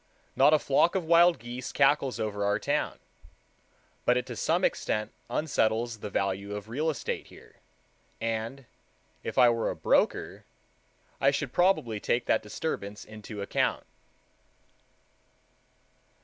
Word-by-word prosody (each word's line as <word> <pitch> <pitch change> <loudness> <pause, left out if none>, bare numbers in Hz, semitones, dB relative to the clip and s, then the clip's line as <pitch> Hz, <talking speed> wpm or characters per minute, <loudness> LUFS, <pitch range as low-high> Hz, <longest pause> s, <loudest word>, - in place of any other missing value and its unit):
Not 135 +3 +6
a 155 - +6
flock 150 +5 +2
of 185 -3 0
wild 170 +1 +5
geese 120 +2 -7
cackles 140 -2 +2
over 105 -2 -2
our 100 0 +2
town, - - -1 1.1
but 125 - +3
it 125 - -1
to - - -7
some - - +1
extent 105 0 -1 0.2
unsettles 115 -6 0
the 105 - -6
value 100 +1 -2
of 105 +1 -7
real 150 +7 -1
estate 155 - -4
here, - - -17 0.6
and, 115 +4 -3 0.6
if - - -6
I 125 -2 +7
were 115 -1 0
a - - -3
broker, - - +1 0.8
I 135 - +4
should 140 -1 -2
probably 175 - +2
take 120 +3 0
that - - +2
disturbance 105 -3 -5
into 105 -1 -8
account. - - 0
120 Hz, 135 wpm, -28 LUFS, 105-140 Hz, 1.1 s, I